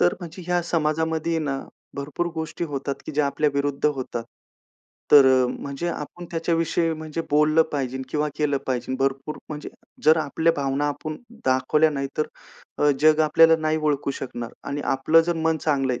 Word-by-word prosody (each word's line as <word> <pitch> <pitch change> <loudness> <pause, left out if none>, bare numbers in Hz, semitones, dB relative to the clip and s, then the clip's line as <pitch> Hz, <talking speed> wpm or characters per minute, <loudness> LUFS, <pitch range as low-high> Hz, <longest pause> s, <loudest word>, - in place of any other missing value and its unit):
तर 90 - +4
म्हणजे 175 +1 -8
ह्या 175 0 +2
समाजामध्ये 160 0 0
ना 140 -4 -2 0.4
भरपूर 145 +5 -3
गोष्टी 160 +1 -4
होतात, 140 -2 -3
की - - -5
ज्या 145 0 +2
आपल्या 150 +1 +1
विरुद्ध 140 0 -1
होतात. 130 -5 -2 0.9
तर 140 -2 +9
अ, 130 -1 +5
म्हणजे 140 +5 -4
आपण 170 +1 -6
त्याच्याविषयी 165 0 0
म्हणजे 155 +1 -5
बोललं 150 +2 +4
पाहिजे 130 -2 -2
किंवा 150 0 0
केलं 145 -2 +1
पाहिजे. 130 0 -2
भरपूर 135 +2 -1
म्हणजे 150 -1 -6 0.4
जर 155 +1 +7
आपल्या 160 +2 +1
भावना 140 +1 0
आपण 155 +2 -4 0.3
दाखवल्या 130 +4 +3
नाही, 140 -1 -3
तर 155 - +2 0.5
अ, 150 - +4
जग 155 +1 +5
आपल्याला 165 +1 +6
नाही 155 0 +1
ओळखू 145 -2 0
शकणार 120 -3 -5 0.2
आणि 145 +1 -3
आपलं 155 +5 +4
जर 170 +1 -1
मन 160 0 +1
चांगलं 135 -4 +1
आहे, 120 - -3
150 Hz, 170 wpm, -24 LUFS, 140-160 Hz, 0.9 s, तर